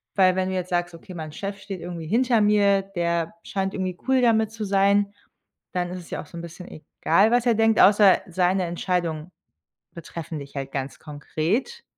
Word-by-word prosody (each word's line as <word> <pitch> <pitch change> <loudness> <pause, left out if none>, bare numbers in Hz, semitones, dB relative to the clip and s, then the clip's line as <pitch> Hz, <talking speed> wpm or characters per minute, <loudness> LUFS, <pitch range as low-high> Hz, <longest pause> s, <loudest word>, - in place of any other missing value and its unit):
Weil, 185 -2 +4
wenn 185 0 0
du - - -3
jetzt 185 0 -3
sagst: 175 -1 -1
„Okay, 170 +3 -11
mein 155 -2 -6
Chef 195 +5 -5
steht 195 -2 -7
irgendwie 170 -2 -6
hinter 235 +2 +2
mir, 200 -2 +3
der 170 +1 -1
scheint 195 0 -3
irgendwie 185 -2 -3
cool 260 -1 +3
damit 220 -2 +3
zu 220 -1 -5
sein." 200 +1 +2 0.6
Dann 180 -1 -2
ist 180 - -5
es 170 - -13
ja - - -3
auch - - -12
so 170 - -11
'n - - -5
bisschen 170 +2 -10 0.3
egal, 195 +7 +4
was 245 0 +2
er 230 - +4
denkt, 225 0 +3
außer 200 -1 +6
seine 180 +1 +1
Entscheidungen 170 -1 -2 0.6
betreffen 165 -1 -7
dich 140 0 -11
halt 135 0 -5
ganz 135 0 -4
konkret. 165 - -3
185 Hz, 195 wpm, -24 LUFS, 170-205 Hz, 0.6 s, außer